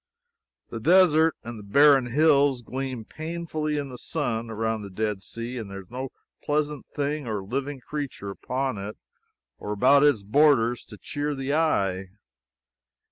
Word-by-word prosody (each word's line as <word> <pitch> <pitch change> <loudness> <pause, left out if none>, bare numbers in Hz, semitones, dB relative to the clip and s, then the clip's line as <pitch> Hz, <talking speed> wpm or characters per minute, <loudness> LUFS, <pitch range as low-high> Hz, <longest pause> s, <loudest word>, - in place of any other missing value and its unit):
The - - -4
desert 165 -3 +5
and 120 -1 -7
the - - -10
barren 135 +4 +5
hills 140 -1 +3
gleam 130 -1 -4
painfully 155 -1 -3
in 140 -1 -3
the 125 -1 -9
sun, 120 -8 -2
around 110 0 -2
the 100 - -7
Dead 105 0 -2
Sea, 120 +4 -6
and 110 -3 -7
there 100 0 -7
is 95 - -20
no 130 +2 -4 0.3
pleasant 150 -1 -1
thing 145 -1 -3
or 105 -3 -2
living 135 +6 -4
creature 140 -9 -5
upon 130 +2 -3
it 100 +2 -6 0.6
or 105 - -5
about 130 +7 +5
its 145 -8 +4
borders 120 0 +3
to 105 - -12
cheer 145 +4 -3
the 135 +1 -2
eye. 95 - +1
130 Hz, 155 wpm, -26 LUFS, 110-145 Hz, 0.6 s, desert